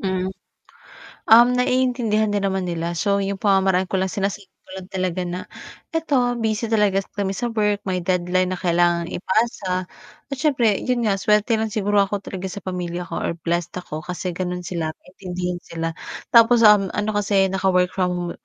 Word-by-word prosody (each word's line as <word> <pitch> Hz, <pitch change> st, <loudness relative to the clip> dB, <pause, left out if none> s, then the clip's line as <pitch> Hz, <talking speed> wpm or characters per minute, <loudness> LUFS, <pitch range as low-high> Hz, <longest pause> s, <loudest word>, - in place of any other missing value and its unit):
Hmm. 185 Hz, -1 st, -1 dB, 1.0 s
Um, 235 Hz, +2 st, +8 dB
naiintindihan 250 Hz, -4 st, +1 dB
din 205 Hz, -, +1 dB
naman 190 Hz, -1 st, -1 dB
nila. 170 Hz, -1 st, -3 dB
So 200 Hz, +3 st, +1 dB
'yong 200 Hz, 0 st, -1 dB
pamamaraan 190 Hz, -2 st, +2 dB
ko 190 Hz, -, +1 dB
lang, 190 Hz, -, +1 dB
sinasabi 195 Hz, +1 st, -3 dB, 0.2 s
ko -, -, -26 dB
lang 185 Hz, -, -11 dB
talaga 185 Hz, -1 st, -2 dB
na, 180 Hz, +1 st, -4 dB, 0.5 s
"Ito, 265 Hz, -7 st, 0 dB
busy 220 Hz, 0 st, -1 dB
talaga 200 Hz, -3 st, +2 dB
kami 195 Hz, -1 st, -2 dB
sa 240 Hz, +3 st, -2 dB
work. 210 Hz, -2 st, 0 dB
May 185 Hz, -2 st, -1 dB
deadline 180 Hz, +1 st, 0 dB
na -, -, -10 dB
kailangang 175 Hz, -1 st, +1 dB
ipasa." 190 Hz, -2 st, -1 dB, 0.5 s
At -, -, -1 dB
siyempre, 255 Hz, -9 st, +2 dB
'yon 250 Hz, -2 st, -1 dB
nga, 200 Hz, -2 st, +1 dB
swerte 210 Hz, +2 st, +2 dB
lang 220 Hz, -, 0 dB
siguro 205 Hz, -1 st, +1 dB
ako 200 Hz, 0 st, -4 dB
talaga 190 Hz, 0 st, -5 dB
sa 190 Hz, +2 st, -8 dB
pamilya 180 Hz, -1 st, -4 dB
ko 175 Hz, -, -5 dB
or -, -, -1 dB
blessed 170 Hz, 0 st, -2 dB
ako 155 Hz, -, -6 dB
kasi 180 Hz, +3 st, -4 dB
gano'n 180 Hz, 0 st, -4 dB
sila, 165 Hz, -3 st, -3 dB
maintindihin 180 Hz, -1 st, -6 dB
sila. 165 Hz, -1 st, -4 dB, 0.4 s
Tapos, 235 Hz, 0 st, +6 dB
um, 210 Hz, -2 st, +6 dB
ano 210 Hz, +1 st, -1 dB
kasi 195 Hz, -2 st, +1 dB
naka-work 185 Hz, -1 st, +2 dB
from 180 Hz, -2 st, -1 dB
195 Hz, 170 wpm, -22 LUFS, 180-215 Hz, 1.0 s, Um